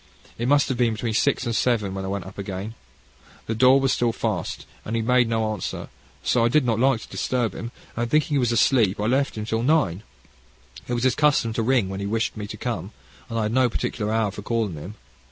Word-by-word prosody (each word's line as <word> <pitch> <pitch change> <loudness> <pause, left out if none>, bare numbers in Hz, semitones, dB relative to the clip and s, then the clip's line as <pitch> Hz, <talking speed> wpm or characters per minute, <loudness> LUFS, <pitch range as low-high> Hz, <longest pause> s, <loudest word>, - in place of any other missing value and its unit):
It 120 - -1
must 145 +1 +4
have 130 -2 -2
been 120 -2 +3
between 110 +1 -3
six 135 +3 +1
and 115 -1 -1
seven 105 -3 +1
when 95 0 -4
I - - -4
went 100 -1 -3
up 95 - -10
again. 100 +2 -5 0.7
The 115 - -2
door 130 +4 +6
was 135 -1 +2
still 120 -1 +1
fast, - - -3 0.2
and 110 - -3
he 115 - 0
made 125 0 +3
no 110 -1 0
answer, 105 -5 -5 0.3
so 120 - +2
I - - +5
did 130 +3 +3
not 115 -2 +1
like 130 -2 +3
to - - -10
disturb 125 -3 -1
him, 115 - -6 0.3
and 120 0 -1
thinking 150 +2 +2
he 140 - +3
was 120 -2 +1
asleep, 115 -4 +3
I 105 - 0
left 135 +2 +1
him 105 - -3
till 110 +1 -1
nine. 125 - +2 0.9
It 120 - -1
was 120 - -2
his 130 -2 +4
custom 145 -6 +2
to 115 - -1
ring 120 -3 +2
when 95 0 -5
he 100 - -3
wished 115 +2 -1
me 105 -1 -5
to - - -7
come, - - -4 0.4
and 115 - -3
I 110 - +1
had 105 +1 -1
no 130 -1 +4
particular 110 -1 -2
hour 110 -2 +1
for 105 - -8
calling 110 -3 -1
him. 85 +7 -8
115 Hz, 245 wpm, -24 LUFS, 105-125 Hz, 0.9 s, door